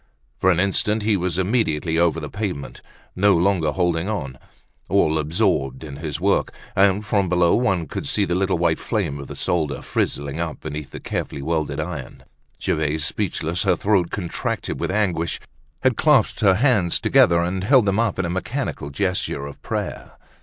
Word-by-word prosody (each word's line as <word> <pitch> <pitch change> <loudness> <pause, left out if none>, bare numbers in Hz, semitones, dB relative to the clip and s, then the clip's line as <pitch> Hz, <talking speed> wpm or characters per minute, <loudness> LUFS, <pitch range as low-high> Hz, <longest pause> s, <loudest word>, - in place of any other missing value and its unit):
For 95 - +3
an 90 -2 +3
instant 105 +3 +1
he 105 0 +2
was 90 -2 -1
immediately 90 -6 +1
over 85 -1 +2
the 75 - -5
pavement, 90 -5 -5 0.3
no 100 +1 +4
long 95 +1 +2
holding 85 +3 0
on, 70 -12 -4 0.5
all 80 0 +3
absorbed 70 -3 0
in 70 -3 -8
his 75 0 -4
work; 100 +3 +1 0.2
and, 100 +2 +3
from 100 -3 +1
below, 90 -1 +3
one 95 -9 +1
could - - -5
see 100 - +1
the 90 - -1
little 95 0 +1
white 85 -1 +1
flame 85 -11 -2
of 70 - -8
the - - -8
solder 80 -4 -1
frizzling 70 +2 -2
up 85 -2 -3
beneath 75 -2 -6
the - - -8
carefully 70 - -4
wielded 80 0 -1
iron. - - -6 0.4
Gervaise, 75 0 0
speechless, 85 -3 -2
her - - +3
throat 95 -5 +1
contracted 90 -4 -3
with - - -2
anguish, 95 -5 0 0.4
had - - +3
clasped - - +3
her 95 -3 +5
hands 110 - +2
together, 85 -1 +4
and 90 +2 -2
held 125 +2 +5
them 100 +1 +1
up 115 -3 +1
in 85 -2 -1
mechanical 95 - -3
gesture 90 -2 -1
of 70 - -10
prayer. - - -5
90 Hz, 175 wpm, -22 LUFS, 80-100 Hz, 0.5 s, her